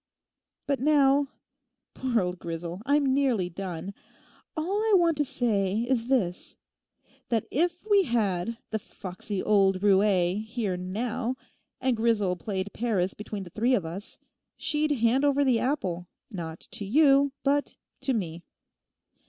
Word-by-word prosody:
But 280 -1 0
now 280 0 +4 0.7
(poor 250 -4 0
old 180 0 -3
Grisel, 170 +2 -5
I'm 285 -2 +3
nearly 250 -10 +1
done) 185 +1 -5 0.6
all 375 +7 0
I 440 -2 +4
want 340 -2 +3
to 295 - +3
say 220 -6 +1
is 240 -2 0
this: 205 -10 0 0.7
that 225 -3 +1
if 345 +6 0
we 405 -3 +5
had 220 -3 0
the 220 - -1
"foxy 190 0 -6
old 195 -3 +3
roué" 195 -1 +3
here 220 -4 -2
now, 230 +7 -2 0.4
and 260 -1 +2
Grisel 220 -5 +1
played 190 +2 -4
Paris 200 -6 0
between 210 -1 -6
the 175 - -11
three 240 +6 +2
of 195 -8 -1
us, 180 +6 -6 0.4
she'd 305 0 +1
hand 255 -1 +2
over 285 0 +3
the 250 -4 +3
apple 185 - -2 0.2
not 165 -4 -6
to 235 -3 -1
you 275 +4 +4
but 285 +1 +1 0.3
to 265 - +2
me. 170 -5 -3
225 Hz, 140 wpm, -27 LUFS, 190-275 Hz, 0.7 s, we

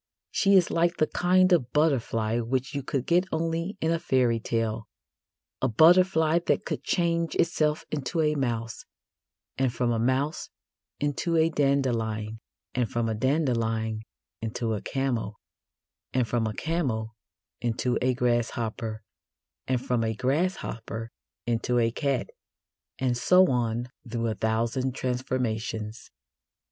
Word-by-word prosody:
She 200 -1 +3
is 180 -3 +4
like 170 +1 +2
the 155 - +3
kind 185 +3 +3
of 125 -8 +1
butterfly 120 -7 +1
which 130 +4 -2
you 140 - -2
could 130 -1 -2
get 180 +2 +3
only 165 +4 -2
in 160 - +1
a 165 - +1
fairy 125 -8 +2
tale 110 -1 -2 0.7
a 130 - +3
butterfly 160 - +5
that - - +1
could - - -3
change 170 -2 0
itself 155 -2 +1
into 150 +2 -2
a 150 -1 +2
mouse, 115 -5 -2 0.8
and 130 -2 +2
from 120 0 0
a 115 - 0
mouse 130 +6 0 0.5
into 145 +4 0
a 160 +1 +3
dandelion, 115 -7 0 0.3
and 125 -3 0
from 115 -1 0
a 110 - 0
dandelion 115 -4 0 0.4
into 115 0 -2
a 105 - -3
camel, 125 -6 -2 0.8
and 125 -2 +1
from 115 -2 0
a 110 - -3
camel 125 -10 -2 0.5
into 120 +1 0
a 130 0 +2
grasshopper, 115 -2 -1 0.6
and 130 -2 0
from 120 -2 +1
a 110 0 -1
grasshopper 125 - -2 0.3
into 120 +1 0
a 115 -1 +3
cat, 140 +2 -1 0.7
and 125 -2 0
so 180 +8 +5
on 120 -1 0 0.2
through 115 0 -2
a 115 - 0
thousand 115 +4 -1
transformations. 120 -4 -3
125 Hz, 135 wpm, -27 LUFS, 115-155 Hz, 0.8 s, butterfly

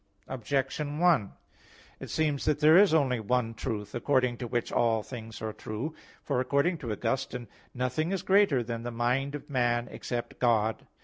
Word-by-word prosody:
Objection 135 +4 -2
1: 165 - +3 0.7
It - - -8
seems 150 -3 0
that 150 -1 +2
there 155 +1 +6
is 195 0 +7
only 135 -6 +2
one 115 +1 0
truth, 105 -2 -4
according 125 -1 +1
to 120 - -5
which 120 +1 -2
all 115 -2 +2
things 115 -3 -8
are 110 -1 -3
true. 115 +12 -5 0.3
For 140 -4 0
according 140 +7 +1
to 120 -7 -4
Augustine 125 +3 -2
(De - - -24
Trin. - - -33
xv, - - -22
1), - - -8
"nothing 155 +7 -1
is 195 - -2
greater 190 -10 +4
than 115 0 -4
the 120 - -4
mind 125 +4 0
of 145 - -8
man, 120 -3 +1
except 120 -1 -5
God." 110 -3 +1
125 Hz, 190 wpm, -29 LUFS, 115-145 Hz, 0.7 s, is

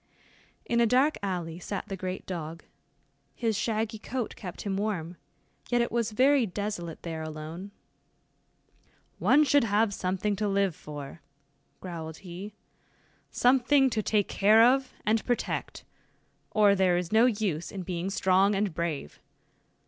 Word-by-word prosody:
In 235 - +1
a 235 - +4
dark 265 +6 +3
alley 175 -4 -3
sat 200 +2 -5
the 195 - -4
great 185 0 -5
dog. 165 -2 -6 0.7
His 225 -2 0
shaggy 220 +1 -1
coat 245 +1 -4
kept 180 -4 -8
him 200 -2 -2
warm, 190 -5 -2 0.5
yet 245 - +2
it 235 - 0
was 235 -2 0
very 260 +2 +4
desolate 185 -4 -5
there 165 -2 -4
alone. 155 +4 -7 1.5
"One 300 - +5
should 285 -1 +4
have 210 0 +2
something 190 +2 -1
to 210 +1 0
live 195 -3 +1
for," 145 +1 -9 0.6
growled 160 -3 -6
he, 190 +4 -8 0.7
"something 265 +2 +3
to 220 - 0
take 210 -1 +1
care 215 +3 +5
of 260 +2 +3
and 215 +1 +2
protect, 245 -1 -2 0.7
or 210 -2 +4
there 185 -2 +3
is 175 -1 -3
no 225 +3 +5
use 205 -8 -1
in 190 -2 -5
being 180 +1 -3
strong 195 +1 +3
and 195 -3 0
brave. 155 - -4
200 Hz, 140 wpm, -28 LUFS, 175-225 Hz, 1.5 s, One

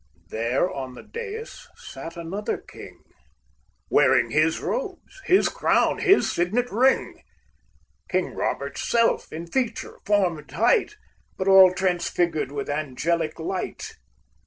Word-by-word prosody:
There 115 +9 0
on 130 -6 -6
the - - -11
dais 455 -1 -8
sat 165 +1 -9
another 180 +5 -3
king, - - -13 0.8
Wearing 115 - +3
his 155 +3 +2
robes, 400 -5 -5
his 375 +2 +4
crown, - - +1
his 395 0 +4
signet 215 +9 0
ring, 255 +5 +2 0.9
King - - -1
Robert's - - -3
self 230 -1 +2
in 165 +2 -6
feature, 240 +7 -3
form 190 -6 +2
and 150 - -16
height, 420 -2 +2 0.4
But 190 - -3
all 190 -1 +8
transfigured 175 -5 0
with 140 -1 -4
angelic 155 +3 -2
light. 180 +3 -4
180 Hz, 120 wpm, -24 LUFS, 155-245 Hz, 0.9 s, all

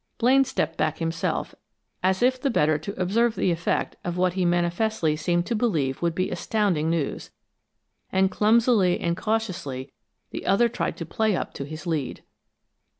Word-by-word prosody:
Blaine 260 +3 +5
stepped 165 - -2
back 155 0 0
himself, 165 0 -2 0.5
as 185 +3 +1
if 255 0 +2
the 275 - +1
better 155 - +2
to 200 +7 -7
observe 220 +5 +2
the 180 - +1
effect 170 0 -1
of 175 0 -3
what 180 0 +2
he 185 -1 0
manifestly 175 0 +1
seemed 175 +2 0
to 235 - -2
believe 160 - 0
would 170 -1 0
be 185 +1 -1
astounding 180 -4 0
news, 165 -4 -2 0.8
and 190 0 +2
clumsily 215 -4 +3
and 170 0 0
cautiously 185 - -3 0.4
the - - -6
other 235 +5 +4
tried 235 - -3
to 165 - -5
play 215 +5 0
up - - -4
to 140 - -5
his 155 +4 -8
lead. 155 -6 -3
180 Hz, 165 wpm, -25 LUFS, 165-220 Hz, 0.8 s, Blaine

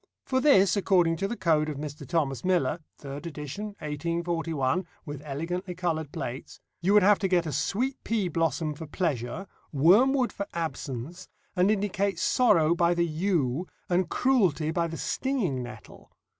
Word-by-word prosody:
For 260 -1 +1
this, 195 - +5
according 180 -4 +3
to 195 - -1
the 235 - -4
code 155 -3 +2
of 150 - -4
Mr. 150 0 -7
Thomas 140 -7 0
Miller 175 -5 +1 0.2
(third 145 +3 -7
edition, 150 +5 -6
1841, 165 +1 -1 0.2
with 145 -3 -6
elegantly 175 +6 -4
coloured 160 -4 -2
plates) 125 +3 -6 0.2
you 195 +4 +3
would 210 - +7
have 205 +1 +5
to 195 - +1
get 180 -2 +2
a 155 - -3
sweet 230 - -1
pea 215 -4 0
blossom 165 -2 0
for 155 +2 -8
Pleasure, 150 - -2 0.3
wormwood 235 - +4
for 200 - -4
Absence, 160 0 -4 0.3
and 180 +2 +3
indicate 200 -1 0
Sorrow 170 -11 +4
by 170 0 +2
the 170 0 +2
yew, 165 -2 0 0.2
and 180 -1 +1
Cruelty 185 - +2
by 170 0 0
the 165 0 -6
stinging 215 - -1
nettle. 120 0 -11
170 Hz, 155 wpm, -27 LUFS, 150-195 Hz, 0.3 s, would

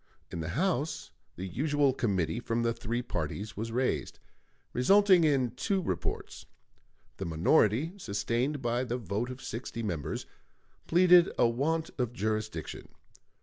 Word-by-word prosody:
In - - -4
the 80 0 -3
House 155 -4 -1 0.2
the 95 - -5
usual 140 - +1
committee 100 -4 0
from 115 -1 -1
the 115 0 +1
three 120 +2 -3
parties 100 +2 -4
was 115 +2 -4
raised, 125 +2 -1 0.6
resulting 190 +7 +5
in 135 -6 +2
two 195 - -1
reports. 90 - -4 0.7
The 95 - -4
minority, 105 - +3
sustained 120 - -1
by 120 +1 +1
the 125 0 -2
vote 110 +2 -3
of 130 +1 -8
sixty 115 0 -5
members, 85 -9 -3 0.6
pleaded 175 0 +6
a 120 - +5
want 155 +7 -1
of 120 -1 -1
jurisdiction. 110 -5 -3
120 Hz, 135 wpm, -30 LUFS, 105-145 Hz, 0.7 s, pleaded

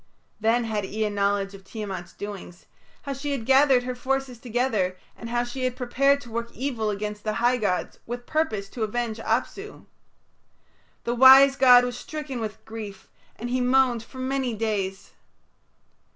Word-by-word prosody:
Then 225 +3 +2
had 215 -2 -2
Ea 210 +2 -2
knowledge 200 -1 0
of 195 -1 -12
Tiamat's 190 -3 -6
doings, 200 -4 -8 0.4
how 280 - -3
she 280 +2 -3
had 245 -5 -4
gathered 265 -1 +5
her 250 0 -3
forces 260 -1 -2
together, 225 -7 -1 0.2
and 230 - -8
how 240 0 0
she 245 +2 -5
had 255 -1 0
prepared 275 +3 +2
to 240 -4 -12
work 235 +1 -3
evil 240 -5 -2
against 210 0 -4
the 215 - -1
high 240 +3 +2
gods 180 -7 -2
with 240 +1 -5
purpose 310 -11 -1
to 235 - -8
avenge 225 +1 -2
Apsu. - - -3 1.2
The 235 - -1
wise 265 +2 +8
god 250 -2 +7
was 245 0 -4
stricken 300 -5 -6
with 215 -2 -6
grief, 215 -3 -8 0.3
and 240 +1 -6
he 255 0 +1
moaned 250 -2 +3
for 230 +3 -14
many 260 -2 -1
days. 205 -3 -3
240 Hz, 165 wpm, -25 LUFS, 210-260 Hz, 1.2 s, wise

